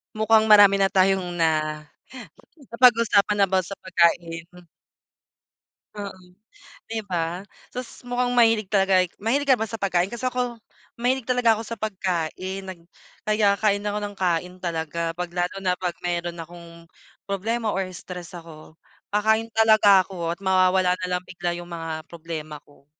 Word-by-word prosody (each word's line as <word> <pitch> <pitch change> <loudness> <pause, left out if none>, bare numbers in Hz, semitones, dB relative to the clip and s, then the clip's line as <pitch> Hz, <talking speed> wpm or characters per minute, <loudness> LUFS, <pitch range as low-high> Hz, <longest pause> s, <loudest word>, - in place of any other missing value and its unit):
Mukhang 220 0 +3
marami 205 -2 +7
na 195 - +4
tayong 190 -2 +1
na, 155 -2 0 0.8
napag-usapan 220 -4 +4
about 185 0 +1
sa 195 +3 -9
pagkain. 170 -2 +1 1.5
Oo, 200 -2 -7 0.7
'di 225 -1 -2
ba, 170 0 -2 0.3
tas 250 0 -8
mukhang 245 0 -1
mahilig 225 -4 +4
talaga 195 -2 +3 0.2
mahilig 270 +7 -1
ka 260 - +6
ba 220 - -2
sa 225 - -6
pagkain 185 -1 +1
kasi 255 +2 -2
ako, 245 -2 -3 0.4
mahilig 255 0 0
talaga 245 -3 +3
ako 225 - -5
sa 230 -1 -7
pagkain 190 -2 -3
nag 185 -3 -8 0.4
kaya 210 -2 +2
kain 205 -1 0
ako 205 0 -1
ng 205 0 -6
kain 180 0 -1
talaga 165 -1 -3
'pag 180 -1 -4
lalo 175 +1 -2
na 180 -1 +1
'pag 180 -2 -3
meron 175 -1 -2
akong 170 +1 -12 0.6
problema 215 +3 -2
or 190 0 -1
stress 180 0 -9
ako, 160 -1 -13 0.4
kakain 220 +2 +2
talaga 215 -4 +6
ako 170 -3 -4
at - - -29
mawawala 185 -1 +3
na 180 - -2
lang 180 - -5
bigla 175 -1 -4
yung 175 0 -9
mga 165 -2 -5
problema 160 -3 -7
ko. 145 -1 -24
190 Hz, 150 wpm, -24 LUFS, 175-215 Hz, 1.5 s, marami